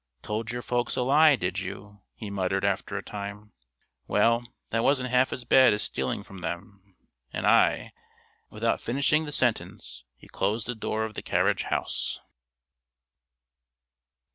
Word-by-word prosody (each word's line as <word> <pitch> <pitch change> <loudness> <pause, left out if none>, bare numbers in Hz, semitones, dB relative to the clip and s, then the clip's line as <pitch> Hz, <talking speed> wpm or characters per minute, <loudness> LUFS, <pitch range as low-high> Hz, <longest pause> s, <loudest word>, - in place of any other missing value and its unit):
"Told 110 +1 -3
your 120 0 -5
folks 120 -1 0
a 130 - 0
lie, 150 +3 +6
did 90 -4 -2
you?" 100 +2 -8
he 105 -3 -7
muttered 95 0 -1
after 100 -1 -1
a - - -5
time. 105 +1 -7 0.6
"Well, 115 +3 +3 0.3
that 115 0 +1
wasn't 130 -3 +2
half 125 +1 +3
as 125 - -5
bad 130 -4 +6
as 105 - -1
stealing 65 -1 -2
from 95 - -11
them, 95 +2 -7 0.4
and - - -3
I - - +3 0.3
" - - -37
Without - - -1
finishing 140 +5 +1
the 150 - -6
sentence, 120 - -1
he - - -16
closed 105 +3 -1
the 125 - -2
door 110 -1 -2
of 110 - -7
the - - -5
carriage - - +1
house. - - -2
110 Hz, 155 wpm, -27 LUFS, 100-125 Hz, 0.6 s, lie